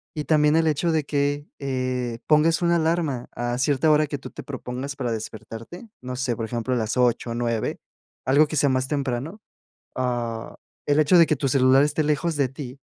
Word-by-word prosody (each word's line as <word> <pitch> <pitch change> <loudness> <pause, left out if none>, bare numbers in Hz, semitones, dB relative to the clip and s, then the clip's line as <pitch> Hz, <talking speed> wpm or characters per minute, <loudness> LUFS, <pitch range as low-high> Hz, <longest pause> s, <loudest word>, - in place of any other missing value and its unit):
Y 150 -1 -3
también 150 -1 +3
el 165 0 +3
hecho 155 +3 +1
de 160 -2 +1
que, 145 0 -1
eh, 130 -3 -2
pongas 160 +3 +4
una 170 0 +3
alarma 160 -6 -1
a 120 0 -2
cierta 140 +3 +2
hora 150 0 +4
que 145 - -4
tú - - -9
te - - -9
propongas 135 0 -6
para 125 -3 -2
despertarte, 115 - -8
no 125 0 -5
sé, 125 -2 -1
por 115 - -3
ejemplo, 120 +2 -2
a - - +1
las 110 +1 -2
8 125 -1 +2
o - - -3
9, 115 -2 -1 0.5
algo 140 +4 +4
que 155 - -5
sea 140 0 +3
más 130 0 0
temprano. 140 - -2 0.6
Ah, 120 -3 -3 0.3
el 145 +1 +3
hecho 155 +4 +4
de 165 - +7
que 155 - +1
tu 140 0 -1
celular 130 0 +5
esté 150 +1 0
lejos 155 +3 0
de 140 -2 +2
ti, 135 0 -9
135 Hz, 205 wpm, -24 LUFS, 125-150 Hz, 0.6 s, de